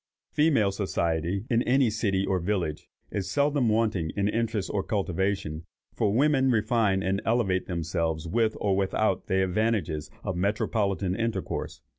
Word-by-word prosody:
Female 145 -10 +3
society, 95 -1 -1
in 120 -3 +2
any 125 -1 +3
city 100 -3 0
or 95 -1 0
village, 85 -4 -2 0.2
is 95 -2 -3
seldom 140 0 +2
wanting 105 -7 +1
in 100 0 +2
interest 110 -2 -1
or 100 - +1
cultivation; 95 -4 -2 0.3
for 105 -4 +1
women 135 +2 +3
refine 110 -4 +2
and 95 +2 0
elevate 105 -6 +1
themselves 85 -2 -2
with 110 +4 +1
or 100 -2 +1
without 95 +1 0
the 95 0 +2
advantages 95 -5 -1
of 95 - -2
metropolitan 100 0 0
intercourse. 115 -3 -3
100 Hz, 140 wpm, -27 LUFS, 95-115 Hz, 0.3 s, Female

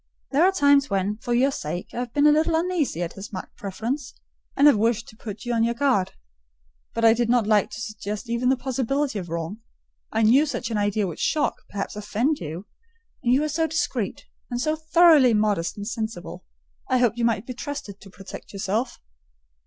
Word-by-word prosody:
There 290 +4 +4
are 375 - +5
times 285 -5 +4
when, 200 +2 0
for 240 - -6
your 265 +3 +3
sake, 175 - -5
I - - -7
have 245 -1 -4
been 290 +4 +2
a 300 - +8
little 320 +2 +2
uneasy 325 - 0
at 170 - -5
his 195 +2 -9
marked 185 -3 -7
preference, 230 +7 -4 0.4
and 280 - +4
have 295 - +8
wished 225 +1 +1
to - - -15
put 215 0 -8
you 240 - -1
on 225 -1 +2
your 235 +1 +1
guard: 250 -8 +1 0.8
but 230 0 +1
I 225 - +8
did 235 0 0
not 240 -2 +3
like 210 -1 +3
to 210 - -8
suggest 215 +1 -5
even 235 +2 0
the 265 - +3
possibility 265 -1 -1
of 175 -3 -7
wrong. 170 +5 -4 0.5
I 220 0 +1
knew 265 +8 +5
such 245 -4 -3
an 220 - 0
idea 205 0 +1
would 170 -4 -6
shock, 300 -2 +1 0.2
perhaps 200 0 -4
offend 225 +8 -1
you; 165 +4 -6 0.6
and 240 - +1
you 260 +3 +4
were 305 - 0
so 320 +2 0
discreet, 320 +2 -2 0.2
and 240 -1 -3
so 310 +5 +1
thoroughly 315 -6 +5
modest 210 -5 0
and 205 0 -5
sensible, 220 -6 -5 0.4
I 255 - +3
hoped 245 -2 +2
you 235 - +2
might 225 -2 0
be 255 - -5
trusted 250 -6 -7
to 195 - -13
protect 195 +2 -11
yourself. 205 +5 -2
235 Hz, 205 wpm, -24 LUFS, 205-280 Hz, 0.8 s, a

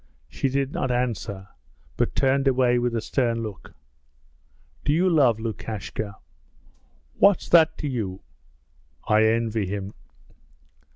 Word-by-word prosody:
She 135 - -2
did 135 +1 -1
not 130 - -1
answer, 115 -5 -2 0.5
but - - -1
turned 135 +1 +2
away 125 -2 +3
with 120 -1 -1
a 115 - -1
stern 115 -2 -1
look. 105 -3 -9 1.1
'Do - - +1
you 175 +4 +2
love 135 -10 +3
Lukashka?' 110 -2 -5 1.0
'What's 200 -2 +4
that 160 -2 +5
to 150 - -4
you?' 105 -8 -4 0.9
'I 110 0 +4
envy 110 -2 0
him!' 100 +1 -5
120 Hz, 120 wpm, -24 LUFS, 110-135 Hz, 1.1 s, that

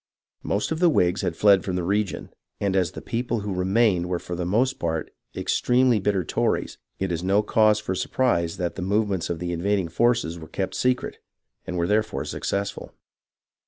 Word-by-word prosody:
Most 100 +8 -1
of 160 - -1
the 175 -1 +5
Whigs 90 - +2
had 90 -4 -2
fied 100 -3 +5
from 95 - -3
the 90 - -1
region, 100 +2 -1 0.3
and 100 -2 0
as 90 -4 +1
the - - -8
people 120 -1 -2
who 100 -1 -3
remained 95 -1 +2
were 90 - 0
for 90 +1 -6
the 85 0 -3
most 130 +7 +1
part 80 -2 -2 0.2
extremely 125 -2 +2
bitter 95 -1 0
Tories, - - -1 0.2
it 95 -1 -2
is 85 -1 -2
no 100 +3 +3
cause 105 0 +3
for 105 -3 -3
sur - - -3
prise 85 -11 +1
that 90 -1 -2
the - - -6
movements 100 -1 0
of 85 - -2
the 90 +1 -4
invading 95 +1 0
forces 115 -4 +1
were 80 - -10
kept 95 - -3
secret, 125 0 -1 0.5
and 90 -1 -3
were 85 - +1
therefore 105 -8 0
successful. 100 0 -3
95 Hz, 195 wpm, -24 LUFS, 90-110 Hz, 0.5 s, the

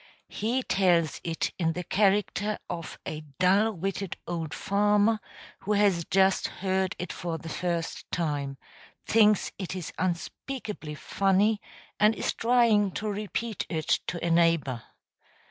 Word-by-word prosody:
He 240 +5 -1
tells 175 - +2
it 165 -1 -1
in 165 -2 +1
the 180 - -4
character 205 +2 +1
of 170 -2 -6
a 155 - -4 0.2
dull 195 +5 +4
witted 195 +1 -3
old 165 -3 -3
farmer 210 +3 +2 0.4
who 210 - -1
has 200 -5 +3
just 190 0 +3
heard 190 0 -1
it 180 - -5
for 170 -2 -3
the 165 +1 -8
first 170 -1 -3
time, 145 -5 -2 0.5
thinks 215 -2 +4
it 190 -1 -4
is 180 -4 -5
unspeakably 185 - -4
funny, 200 +6 +2 0.4
and 210 +1 +5
is - - -1
trying 230 -5 +3
to 215 - -3
repeat 215 +1 -3
it 160 -2 +1
to 175 - -3
a 170 - +1
neighbor. 165 -8 +2
190 Hz, 135 wpm, -28 LUFS, 170-210 Hz, 0.5 s, and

